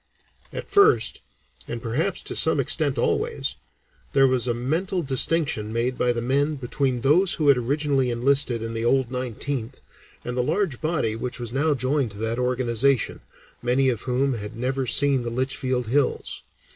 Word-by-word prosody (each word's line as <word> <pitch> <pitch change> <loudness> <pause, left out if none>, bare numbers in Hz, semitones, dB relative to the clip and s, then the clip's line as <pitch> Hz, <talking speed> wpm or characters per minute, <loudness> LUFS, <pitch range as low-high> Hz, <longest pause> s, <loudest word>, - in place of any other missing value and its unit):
At - - -7
first, 410 +2 +4 0.5
and - - -4
perhaps - - -2
to - - -5
some - - +3
extent - - +1
always, 460 +1 -1 0.6
there 135 -1 +5
was 130 -1 0
a 120 - +1
mental 165 +9 -1
distinction 135 -5 +1
made 120 +3 -1
by 125 - +1
the 120 -1 -3
men 140 +4 +1
between 130 -1 -2
those 170 +8 +4
who 150 -3 +2
had 140 - +6
originally 135 +1 0
enlisted 125 -1 +1
in 115 0 -5
the 115 0 -3
"old 130 +1 +1
Nineteenth," 125 0 -4 0.5
and 125 - -3
the 125 - +1
large 160 - -1
body 155 -9 0
which 125 +3 -5
was 120 -1 -6
now 145 +2 +1
joined 130 -1 0
to - - -11
that 110 +3 -2
organization, 125 0 0 0.4
many 130 +2 +2
of 120 -4 -2
whom 130 +2 0
had 105 -1 -6
never 130 +2 -2
seen 140 +1 +3
the 120 - -4
Litchfield 130 0 -1
hills. 130 +4 -1
130 Hz, 170 wpm, -24 LUFS, 120-140 Hz, 0.6 s, had